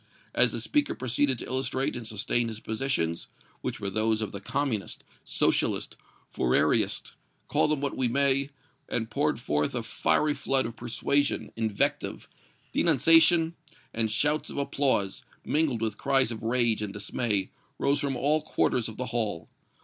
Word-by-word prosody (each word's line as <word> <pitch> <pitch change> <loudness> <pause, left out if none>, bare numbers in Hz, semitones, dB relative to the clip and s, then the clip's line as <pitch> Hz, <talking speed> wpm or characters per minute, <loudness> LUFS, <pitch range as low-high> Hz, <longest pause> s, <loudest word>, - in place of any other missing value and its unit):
As - - +5
the - - -4
speaker 295 -2 0
proceeded 130 +2 0
to - - -6
illustrate 130 +1 -1
and 120 -2 -6
sustain 110 +2 0
his 110 -1 -6
positions, 110 -8 -2 0.3
which - - -4
were 100 -1 -3
those 110 +1 +1
of 105 - -4
the 100 - -7
Communist, 120 -1 -2 0.2
Socialist, - - 0 0.4
Fourierist, 65 0 +1 0.3
call - - +2
them 150 -2 0
which 140 - -1
we 130 - +1
may, 140 +2 +2 0.4
and 115 -1 -2
poured - - 0
forth 75 0 -1
a - - -2
fiery 150 -1 +1
flood 135 -2 0
of 115 0 -5
persuasion, 120 0 -1
invective, 110 -3 -1 0.4
denunciation 165 0 +5 0.4
and 110 -1 +1
shouts 145 +8 +1
of - - -7
applause, 135 -8 0 0.2
mingled 145 -7 +1
with 110 -2 -2
cries 135 -3 +2
of 110 - -6
rage 115 -1 +1
and 105 -2 -3
dismay, 105 -1 -1 0.3
rose 140 +1 +1
from 140 -2 -1
all 150 +5 +2
quarters 125 -6 0
of 110 - -10
the 130 - -3
hall. 105 -8 -2
120 Hz, 155 wpm, -28 LUFS, 110-140 Hz, 0.4 s, As